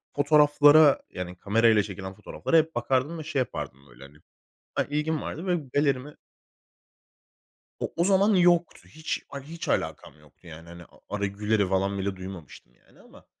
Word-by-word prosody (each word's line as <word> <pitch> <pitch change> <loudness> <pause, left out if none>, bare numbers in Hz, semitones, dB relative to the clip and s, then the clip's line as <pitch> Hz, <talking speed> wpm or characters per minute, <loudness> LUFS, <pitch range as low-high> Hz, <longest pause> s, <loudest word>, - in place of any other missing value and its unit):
fotoğraflara 145 0 +5
yani 90 0 -7
kamerayla 110 +2 +3
çekilen 95 -1 -7
fotoğraflara 105 +10 -1
hep 160 0 +1
bakardım 135 +6 -1
ve - - -6
şey 145 -2 -2
yapardım 70 - -5
böyle - - -15
hani 70 +2 -15 0.6
Ha, - - +1
ilgim 150 +1 -1
vardı 170 +5 -6
ve 180 -1 +1 0.2
galerimi 145 0 0 1.6
O - - -3
o 170 - +2
zaman 200 +2 +3
yoktu. 175 -2 +2
Hiç 155 +1 -5
a 140 - -6
hiç 160 +5 -8
alakam - - -3
yoktu 75 +4 -23
yani 80 0 -12
hani 85 0 -11 0.3
Ara 100 0 -2
Güler'i 105 0 0
falan 100 +1 0
bile 95 0 -3
duymamıştım 95 -9 -11
yani - - -25
ama - - -18
125 Hz, 155 wpm, -26 LUFS, 95-155 Hz, 1.6 s, fotoğraflara